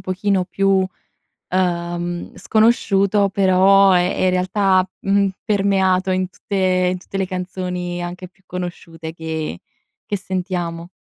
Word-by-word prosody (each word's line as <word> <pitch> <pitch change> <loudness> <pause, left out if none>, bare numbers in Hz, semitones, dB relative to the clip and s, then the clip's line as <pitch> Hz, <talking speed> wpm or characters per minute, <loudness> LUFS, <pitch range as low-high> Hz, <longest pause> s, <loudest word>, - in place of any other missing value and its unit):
pochino 185 0 0
più, 195 0 +2 0.6
ehm, 175 -1 -2
sconosciuto 205 -3 +2
però, 195 0 +5
è 180 0 +2
è - - -1
in 185 - +4
realtà, 185 +1 +2
mhmm, 200 0 +2 0.2
permeato 195 -2 +2
in 185 0 0
tutte 200 - -6 0.4
in 185 - -4
tutte 195 - -8
le 190 - 0
canzoni 180 -1 -4
anche 180 +1 -6
più 190 +1 -35
conosciute 170 -3 -6
che 160 - -4 0.5
che 205 - -1
sentiamo. 180 -3 -4
185 Hz, 125 wpm, -20 LUFS, 175-195 Hz, 0.6 s, però